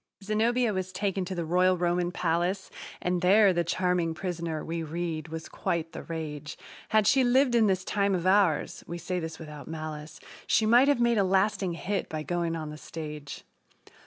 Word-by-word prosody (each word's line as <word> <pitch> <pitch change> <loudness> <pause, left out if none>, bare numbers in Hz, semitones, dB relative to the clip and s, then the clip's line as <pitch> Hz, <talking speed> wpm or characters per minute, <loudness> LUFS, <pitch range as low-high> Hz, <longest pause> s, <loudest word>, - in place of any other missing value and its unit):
Zenobia 225 +3 +1
was 185 -1 -3
taken 195 0 -1
to 185 +1 -5
the 170 -1 -2
royal 180 +2 +3
Roman 175 0 0
palace 175 +3 -1 0.3
And 180 0 0
there 195 +1 +6
the 175 0 +1
charming 175 -1 0
prisoner, 170 -3 -4
we 165 0 -3
read, 160 0 -4
was 160 0 -6
quite 165 -1 -2
the - - -7
rage 155 -2 -6 0.3
Had 215 -1 +3
she 265 +5 +5
lived 255 +1 +3
in 230 -2 +5
this 190 -1 +1
time 200 -2 +1
of 175 -1 -3
ours 185 -5 +2
(we 170 - -5
say 180 +1 -3
this 160 -1 -5
without 150 -3 -9
malice), 155 -1 -6 0.3
She 220 - +3
might 240 +5 +6
have 285 -4 +3
made 235 -2 +3
a - - +4
lasting 190 -1 +1
hit 195 +4 -3
by 155 -1 -4
going 170 0 -1
on 155 -2 -5
the 150 - -9
stage. 150 -3 -7
175 Hz, 190 wpm, -28 LUFS, 160-200 Hz, 0.3 s, there